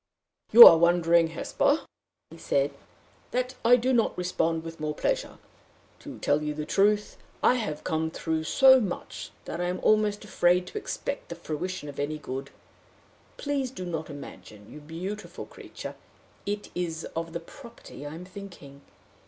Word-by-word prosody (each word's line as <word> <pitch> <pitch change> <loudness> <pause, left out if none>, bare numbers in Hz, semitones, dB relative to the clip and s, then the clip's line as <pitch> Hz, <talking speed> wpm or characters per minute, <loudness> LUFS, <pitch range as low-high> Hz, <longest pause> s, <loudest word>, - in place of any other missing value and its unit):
"You 235 +2 +13
are 165 - +9
wondering, 170 -1 +4
Hesper," 280 - 0 0.5
he - - -11
said, - - 0 0.6
"that 250 +1 -2
I 240 +2 +7
do 250 +2 +1
not 230 -3 +1
respond 165 -2 -1
with 165 0 -9
more 150 0 -3
pleasure. - - -2 0.6
To - - -10
tell 145 +1 +1
you 150 0 -3
the 150 0 -4
truth, 205 +5 +1 0.3
I - - +6
have 210 -12 -3
come 160 0 -1
through 160 -1 -3
so 265 - +6
much 195 -5 -5 0.2
that 175 - -5
I - - 0
am 180 +1 -2
almost 210 -1 +2
afraid 180 -2 +2
to - - -8
expect - - -5
the - - -5
fruition 170 +1 -5
of 145 - -8
any 150 +2 -2
good. 135 -1 -6 0.9
Please 285 -3 -2
do 185 -8 -7
not 165 -3 -4
imagine, 110 -7 -11
you 150 - -10
beautiful 175 +8 -7
creature! - - -9 0.5
it 205 0 -4
is 165 -2 -3
of 165 0 -3
the 170 - -4
property 235 - -13
I 145 +1 -7
am 175 +2 -9
thinking. 180 -8 -11
175 Hz, 160 wpm, -27 LUFS, 160-215 Hz, 0.9 s, You